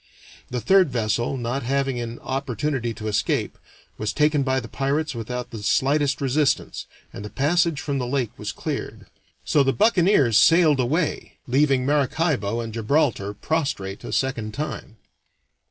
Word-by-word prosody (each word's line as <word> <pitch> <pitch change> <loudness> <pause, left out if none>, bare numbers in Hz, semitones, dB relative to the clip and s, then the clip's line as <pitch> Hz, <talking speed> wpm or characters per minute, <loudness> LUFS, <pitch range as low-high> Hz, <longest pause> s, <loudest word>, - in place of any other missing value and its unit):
The 125 - -2
third 185 - +4
vessel, 120 +1 -1
not 125 +3 -2
having 135 0 -1
an 120 0 -5
opportunity 130 -1 -2
to 110 -1 -6
escape, 105 - -1 0.4
was 110 0 -1
taken 150 +1 +2
by 130 -1 +1
the 120 - -8
pirates 140 +4 -1
without 125 +1 -5
the 110 -3 -7
slightest 140 +7 +1
resistance, 140 +1 0 0.3
and - - -7
the 105 - -6
passage 160 +3 +1
from 140 -3 -2
the 125 - -2
lake 125 -3 -1
was - - -5
cleared. - - -5 0.4
So 145 - +3
the 135 -1 +2
buccaneers 180 - +4
sailed 165 -4 +5
away, 150 +7 -1
leaving 135 0 +2
Maracaibo 140 - 0
and 115 -1 -6
Gibraltar 115 -3 0
prostrate 130 -9 -2
a - - -6
second 115 -5 -2
time. 145 -6 -5
135 Hz, 150 wpm, -23 LUFS, 115-150 Hz, 0.4 s, sailed